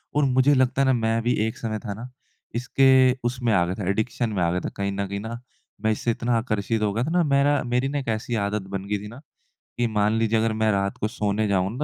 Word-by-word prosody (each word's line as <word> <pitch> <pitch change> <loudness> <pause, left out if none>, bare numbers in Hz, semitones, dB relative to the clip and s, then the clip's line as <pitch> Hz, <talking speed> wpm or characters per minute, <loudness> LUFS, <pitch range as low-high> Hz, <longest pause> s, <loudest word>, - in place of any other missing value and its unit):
और 150 - +3
मुझे 130 +1 +4
लगता 130 +1 +2
है - - +3
ना, 130 - +4
मैं 115 -1 +1
भी 120 +2 +1
एक 110 - -5
समय 110 -2 -3
था 105 - -3
ना 115 +5 -8 0.5
इसके 130 +1 +4 0.2
उसमें 120 -1 -1
आ 90 - +4
गया 90 +2 -3
था 95 -2 -3
एडिक्शन 110 +3 -1
में 100 -4 -2
आ 85 - +2
गया 90 - 0
था - - -4
कहीं 100 0 -1
न 100 0 -3
कहीं 100 +1 -4
न 115 +1 -5 0.5
मैं 110 - +3
इससे 115 +2 0
इतना 120 0 0
आकर्षित 110 -1 -1
हो 105 -1 +1
गया 115 +4 0
था 160 - -3
ना 175 0 +3
मेरा 140 0 +3
मेरी 125 +2 0
ना 145 +1 -1
एक 135 - -7
ऐसी 110 +2 -2
आदत 100 +1 -1
बन 95 0 -4
गई 105 - +1
थी - - -7
ना 115 +5 -11 0.6
कि 120 0 +1
मान 105 0 +1
लीजिए 115 0 +2
अगर 110 0 +1
मैं 110 0 +1
रात 100 -1 -1
को 105 - -1
सोने 105 -1 -1
जाऊँ 95 -1 +1
ना 120 - -7
115 Hz, 270 wpm, -24 LUFS, 105-125 Hz, 0.6 s, मुझे